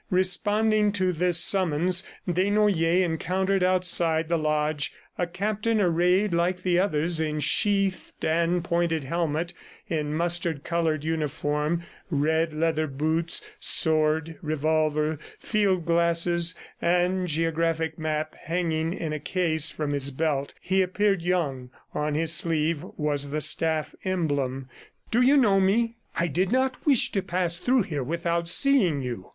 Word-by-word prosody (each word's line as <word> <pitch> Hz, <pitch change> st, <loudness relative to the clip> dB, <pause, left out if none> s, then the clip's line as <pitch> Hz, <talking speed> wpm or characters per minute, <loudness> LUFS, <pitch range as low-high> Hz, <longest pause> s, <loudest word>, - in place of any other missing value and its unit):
Responding 210 Hz, +3 st, +3 dB
to 185 Hz, -2 st, +1 dB
this 175 Hz, +1 st, +1 dB
summons, 180 Hz, 0 st, +2 dB, 0.2 s
Desnoyers 185 Hz, -1 st, +2 dB
encountered 185 Hz, +3 st, 0 dB
outside 175 Hz, -3 st, +2 dB
the 170 Hz, -, +2 dB
lodge, 150 Hz, -1 st, 0 dB, 0.2 s
a 175 Hz, -, -1 dB
captain 215 Hz, +5 st, -1 dB
arrayed 180 Hz, +2 st, +2 dB
like 180 Hz, +2 st, 0 dB
the 180 Hz, -1 st, +2 dB
others 165 Hz, -3 st, 0 dB
in 155 Hz, -1 st, -1 dB
sheathed 195 Hz, +3 st, 0 dB
and 170 Hz, +2 st, +1 dB
pointed 170 Hz, -3 st, 0 dB
helmet, 165 Hz, +3 st, -2 dB, 0.3 s
in 150 Hz, -2 st, -2 dB
mustard 170 Hz, -2 st, -1 dB
colored 165 Hz, -3 st, -1 dB
uniform, 155 Hz, +1 st, -1 dB, 0.3 s
red 160 Hz, +1 st, +1 dB
leather 155 Hz, 0 st, 0 dB
boots, 160 Hz, +4 st, -1 dB, 0.2 s
sword, 155 Hz, 0 st, 0 dB
revolver, 155 Hz, 0 st, 0 dB, 0.2 s
field 195 Hz, -6 st, 0 dB
glasses 170 Hz, +1 st, +1 dB, 0.3 s
and 180 Hz, +1 st, +1 dB
geographic 165 Hz, 0 st, -1 dB
map 155 Hz, 0 st, -2 dB
hanging 165 Hz, -1 st, -2 dB
in 155 Hz, -2 st, -4 dB
a 155 Hz, -, -3 dB
case 160 Hz, -1 st, +1 dB
from 150 Hz, -1 st, -3 dB
his 140 Hz, -1 st, -1 dB
belt. 140 Hz, -1 st, -2 dB
He 190 Hz, +1 st, +1 dB
appeared 195 Hz, 0 st, +1 dB
young; 155 Hz, -8 st, -1 dB, 0.2 s
on 150 Hz, 0 st, -1 dB
his 165 Hz, +1 st, +2 dB
sleeve 165 Hz, -3 st, 0 dB
was 145 Hz, -2 st, -1 dB
the 150 Hz, +2 st, -2 dB
staff 155 Hz, 0 st, 0 dB
emblem. 145 Hz, -8 st, -1 dB, 0.4 s
"Do 240 Hz, -, +3 dB
you 270 Hz, +3 st, +5 dB
know 205 Hz, -7 st, +4 dB
me?... 230 Hz, +5 st, +1 dB, 0.2 s
I 170 Hz, -, +2 dB
did 180 Hz, +6 st, 0 dB
not 260 Hz, +3 st, 0 dB
wish 275 Hz, -5 st, +4 dB
to 195 Hz, -, 0 dB
pass 175 Hz, -2 st, 0 dB
through 250 Hz, +3 st, +2 dB
here 150 Hz, -6 st, -4 dB
without 170 Hz, +3 st, -2 dB
seeing 180 Hz, -, +3 dB
you." 120 Hz, -7 st, -6 dB
170 Hz, 135 wpm, -26 LUFS, 155-185 Hz, 0.4 s, you